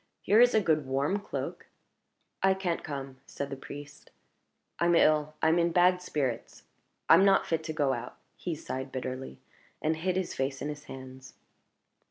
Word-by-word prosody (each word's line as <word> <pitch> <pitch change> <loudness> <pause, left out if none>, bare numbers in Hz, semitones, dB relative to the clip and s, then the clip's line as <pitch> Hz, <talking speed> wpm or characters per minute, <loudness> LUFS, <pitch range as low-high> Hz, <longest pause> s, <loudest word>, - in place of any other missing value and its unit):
Here 210 +4 +5
is 245 -1 +5
a 220 - +5
good 155 -6 +1
warm 140 +9 0
cloak 200 - -6 0.4
" - - -50 0.3
"I 190 0 +4
can't 180 -3 -2
come," 135 -2 -6
said 140 0 -5
the - - -3
priest 145 +2 -10 0.7
"I'm 170 0 +3
ill; 155 -1 +3
I'm 160 +2 +4
in 170 0 +2
bad 180 +1 +4
spirits; 135 -9 -3 0.4
I'm - - +7
not 195 -1 +4
fit 160 -1 -1
to 160 - -3
go 145 -4 +1
out." - - -6 0.2
He 175 -3 -4
sighed 130 -3 -5
bitterly, 130 - -5 0.4
and 160 +1 0
hid 180 +3 -1
his 185 -2 -2
face 135 0 -2
in 145 - -3
his 150 0 -7
hands. 130 -1 -10
155 Hz, 175 wpm, -29 LUFS, 135-175 Hz, 0.7 s, I'm